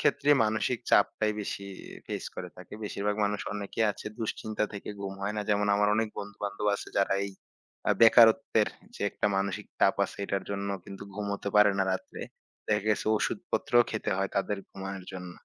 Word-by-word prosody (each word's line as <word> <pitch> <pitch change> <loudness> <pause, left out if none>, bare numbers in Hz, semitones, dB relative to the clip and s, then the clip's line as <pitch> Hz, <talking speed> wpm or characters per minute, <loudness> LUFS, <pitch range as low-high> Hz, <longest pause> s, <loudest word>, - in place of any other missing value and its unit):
ক্ষেত্রে 145 - +3
মানসিক 110 +3 0
চাপটাই 105 +1 +3
বেশি 100 -1 -4 0.4
ফেইস - - -4
করে - - -5
থাকে। - - -10
বেশিরভাগ 105 0 -1
মানুষ 105 0 -1
অনেকেই 105 +2 -1
আছে - - -10
দুশ্চিন্তা 110 -1 -2
থেকে 100 - -7
ঘুম 95 -1 -4
হয় 105 +1 -1
না। - - 0
যেমন, 105 0 +2
আমার 105 0 +3
অনেক 110 0 +1
বন্ধু-বান্ধব 105 0 -4
আছে, - - -6
যারা 100 0 +3
এই 100 - -4 0.6
আ - - +5
বেকারত্বের 115 0 +6 0.3
যে - - -12
একটা - - -1
মানসিক 95 0 -1
চাপ - - +4
আছে, - - -8
এটার 100 0 -1
জন্য 100 0 -2 0.2
কিন্তু 100 - -9
ঘুমোতে 100 -1 -3
পারে 105 -1 +7
না 95 - +3
রাত্রে। 95 - -5 0.5
দেখা 105 -2 +1
গেছে 105 - +1
ওষুধপত্রও 120 +2 +2
খেতে 110 - -2
হয় 95 +1 0
তাদের 100 +1 0
ঘুমানোর 95 -1 -6
জন্য। 90 -1 -7
105 Hz, 175 wpm, -29 LUFS, 100-110 Hz, 0.6 s, পারে